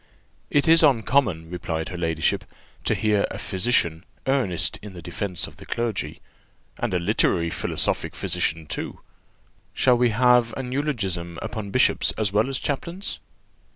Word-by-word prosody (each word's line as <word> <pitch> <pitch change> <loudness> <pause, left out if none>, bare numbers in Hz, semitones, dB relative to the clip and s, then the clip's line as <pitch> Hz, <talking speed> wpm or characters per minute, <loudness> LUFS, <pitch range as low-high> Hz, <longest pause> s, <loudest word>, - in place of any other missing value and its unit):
"It 145 +3 +2
is 165 0 +8
uncommon," 115 - +2
replied 80 -2 -3
her - - -6
ladyship, 80 -2 0 0.4
"to - - +2
hear 105 -2 +2
a - - -6
physician 95 -5 +1 0.2
earnest 130 -11 +1
in 105 -2 -9
the 85 - -8
defence 90 0 -2
of - - -11
the - - -12
clergy 115 -4 -3 0.6
and - - -1
a 90 - +2
literary 85 -2 +1
philosophic - - -1
physician 80 0 -1
too! - - -5 0.7
Shall 125 -2 +4
we 120 -1 +4
have 120 +1 +4
an 130 -2 -4
eulogium 95 - -2
upon 110 -4 -5
bishops 130 +6 +3
as 105 -3 0
well 110 +5 +2
as 135 - -1
chaplains?" 170 +9 -3
105 Hz, 150 wpm, -24 LUFS, 85-125 Hz, 0.7 s, is